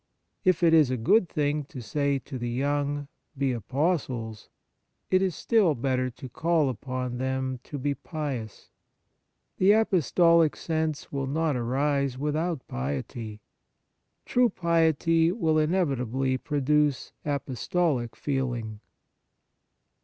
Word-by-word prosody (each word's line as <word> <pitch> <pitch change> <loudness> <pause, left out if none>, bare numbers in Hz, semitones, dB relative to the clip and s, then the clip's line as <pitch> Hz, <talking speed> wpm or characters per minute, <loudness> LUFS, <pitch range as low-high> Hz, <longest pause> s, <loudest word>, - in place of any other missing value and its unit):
If 185 -3 +2
it 165 -1 +5
is 155 -5 +6
a 130 - -1
good 175 - +3
thing 150 0 0
to 135 - -9
say 140 +5 0
to 130 0 -7
the 120 0 -3
young, 145 +3 -1
" - - -33
Be 135 -1 +1
apostles," 125 - -2 0.6
it 185 0 +4
is 185 -4 0
still 200 -8 +2
better 130 0 0
to 125 +2 -10
call 160 +2 +1
upon 125 0 -4
them 130 0 -2
to 145 - -6
be 140 +1 -1
pious. 140 - -6 0.9
The 195 +2 +6
apostolic 170 -6 +4
sense 160 -2 -2
will 140 -1 -2
not 155 +1 0
arise 135 +2 0
without 150 +1 -2
piety: 90 - -5 0.8
true 245 -1 +3
piety 165 -1 +2
will 160 -6 +1
inevitably 135 -6 0
produce 150 -1 +1
apostolic 140 -1 -1
feeling. 120 -6 -3
145 Hz, 120 wpm, -27 LUFS, 130-160 Hz, 0.9 s, is